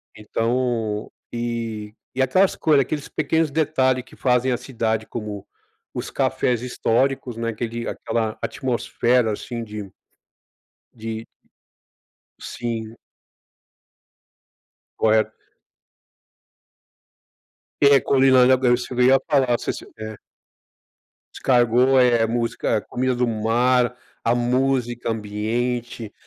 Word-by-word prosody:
Então, 115 0 -1 0.2
e 115 -3 -4 0.2
e - - +2
aquelas 185 +8 +3
coisas, 155 -3 +3
aqueles 150 +1 -4
pequenos 160 0 0
detalhe 135 -4 +1
que 125 - -18
fazem 125 0 +2
a - - 0
cidade, 115 -4 -2
como 105 -3 -6 0.5
os - - -4
cafés 120 -2 0
históricos, 125 0 0
né, 115 0 -2
aquele 115 +1 -4
aquela 110 -2 -2
atmosfera 120 -2 0
assim 120 +3 -5
de 105 -2 -7 1.1
de 110 0 -5 1.1
Sim. 115 -2 -5 2.0
Correto. 110 0 +2 2.5
É, 140 -1 +7
comi 135 0 +3
lá 130 -1 +7
na 130 +1 +6
Bélgica 125 -1 +1
também, 125 0 +4
eu 135 - +7
ia - - +3
falar, 135 -6 +3
se - - -2
se, - - -9
é 110 0 -6 1.2
Escargot, 125 +1 +3
eh, 120 -2 +4
a - - +1
música, 115 -1 -1
comida 130 +3 -1
do 125 0 +1
mar, 120 +3 +2 0.3
a 115 - +3
música 120 -1 0
ambiente 115 +2 -3
120 Hz, 105 wpm, -22 LUFS, 115-130 Hz, 2.5 s, É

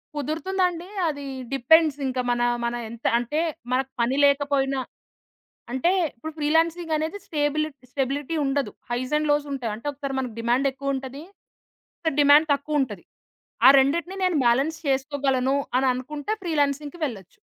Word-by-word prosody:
కుదురుతుందండి. 345 +4 -1 0.2
అది 285 -1 -5 0.3
డిపెండ్స్ 300 +3 +4
ఇంకా 255 -1 -1
మన 240 0 0 0.2
మన 235 - -1 0.2
ఎంత 235 +1 -11
అంటే, 245 +6 -2 0.3
మనకు 265 +1 0
పని 240 +3 +1
లేకపోయినా 280 -1 +2 0.9
అంటే 260 +7 +2 0.2
ఇప్పుడు 315 +7 -7
ఫ్రీలాన్సింగానేది 320 +2 0
స్టెబుల్ 305 -1 0 0.2
స్టెబిలిటీ 280 +4 -2
ఉండదు. 275 0 0 0.2
Highs 255 +3 -2
and 305 0 -1
లోసుంటాయి. 280 -6 -1
అంటే 230 - -14
ఒకసారి 275 -1 -5
మనకు 250 -4 -4
డిమాండ్ 240 +4 +2
ఎక్కువుంటది. 270 0 -4 0.8
ఒకసారి 320 -4 -2
డిమాండ్ 290 +2 +6
తక్కువుంటది. 275 - -2 0.6
ఆ! - - +11
రెండిటిని 335 +8 +1
నేను 360 -4 +2
బాలన్స్ 275 +7 +2
చేసుకోగలను 270 -1 +1 0.2
అని 265 +1 +2
అనుకుంటే, 290 +9 -4
ఫ్రీలాన్సింగ్‌కి 295 -1 -1
వెళ్ళొచ్చు. 220 - -7
280 Hz, 125 wpm, -24 LUFS, 260-310 Hz, 0.9 s, ఆ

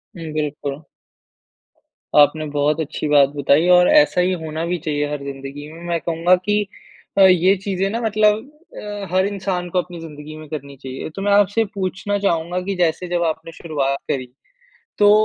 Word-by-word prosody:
हुँ, 165 -3 -7
बिल्कुल। 145 -1 -4 1.3
आपने 150 +2 +4
बहुत 145 +2 +1
अच्छी 155 0 -4
बात 145 -2 +5
बताई 145 +4 +3
और 180 0 +6
ऐसा 295 -12 +5
ही 180 - +2
होना 160 +1 -3
भी 175 +1 -1
चाहिए 145 -1 -1
हर 145 -1 -4
ज़िंदगी 140 +2 -7
में। 165 - -12
मैं 170 -1 0
कहूँगा 170 +2 +3
कि 205 +3 0 0.6
अ, 195 - +6
ये 185 0 +6
चीज़ें 195 -1 -1
ना 230 +3 -3
मतलब 215 -1 +3 0.4
अ, 205 -1 -6
हर 185 +1 +3
इंसान 190 -3 -3
को 180 - +1
अपनी 175 -1 -10
ज़िंदगी 155 -1 -9
में 155 -1 -10
करनी 140 -2 -7
चाहिए। 130 +2 -7
तो 195 - -5
मैं 205 - +1
आपसे 205 +2 +3
पूछना 195 +1 -2
चाहूँगा 175 -2 0
कि 195 +1 -3
जैसे 175 0 0
जब 175 -1 0
आपने 160 0 -3
शुरुआत 140 -5 -2
करी, 130 -2 -2 0.7
तो 205 0 +6
170 Hz, 175 wpm, -20 LUFS, 150-190 Hz, 1.3 s, और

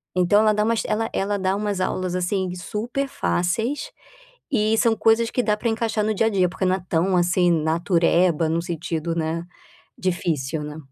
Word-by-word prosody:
Então 185 +3 +4
ela 215 -1 +4
dá 210 0 +1
umas 225 +1 +1
ela 225 +1 -1
ela 200 +1 0
dá 190 0 0
umas 205 -1 -2
aulas, 185 -1 -1
assim, 185 0 -1
super 230 +9 -3
fáceis, 235 - -1 0.6
e 220 -4 +2
são 230 -1 +3
coisas 225 +2 +3
que 250 - 0
dá 210 -3 +1
para 220 +3 -2
encaixar 225 -1 0
no 215 0 0
dia 220 - +2
a - - +4
dia, 185 -3 +2
porque 185 +2 -4
não 185 0 +2
é 185 - -10
tão 180 +3 +1
assim, 175 0 +3
natureba 170 0 +2
no 165 +1 0
sentido, 170 -1 -3
né, 165 +1 -2 0.5
difícil, 160 -5 -2
né. 150 +1 -7
185 Hz, 185 wpm, -23 LUFS, 170-215 Hz, 0.6 s, Então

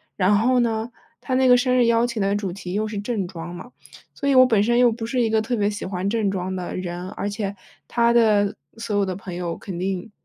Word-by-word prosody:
然 195 +2 +3
后 250 +5 +3
呢， 225 -1 -1 0.3
他 260 - -2
那 260 0 +3
个 250 - +7
生 250 0 +1
日 245 - +4
邀 235 +1 +3
请 235 -2 -4
的 195 +1 +1
主 200 -3 -2
题 180 -1 -7
又 215 +2 0
是 215 -1 -5
正 205 -3 -2
装 175 -1 -8
嘛， 210 +8 -10 0.4
所 280 - -3
以 280 - +4
我 255 -1 +8
本 220 -5 +3
身 240 +2 +2
又 245 -1 +5
不 225 0 -5
是 245 +2 0
一 230 - +1
个 220 0 +2
特 240 +3 -2
别 205 -2 +1
喜 205 0 -5
欢 185 +1 -2
正 215 -2 0
装 190 -1 -3
的 180 -1 -5
人， 180 0 -5
而 205 0 -4
且 200 -1 -4 0.3
他 235 -1 +2
的 215 -4 +3 0.2
所 225 -2 -3
有 200 - +2
的 185 -1 -3
朋 185 -1 -8
友， 175 -1 -3
肯 190 -5 -7
定 190 +3 -3
210 Hz, 275 characters per minute, -23 LUFS, 190-235 Hz, 0.4 s, 我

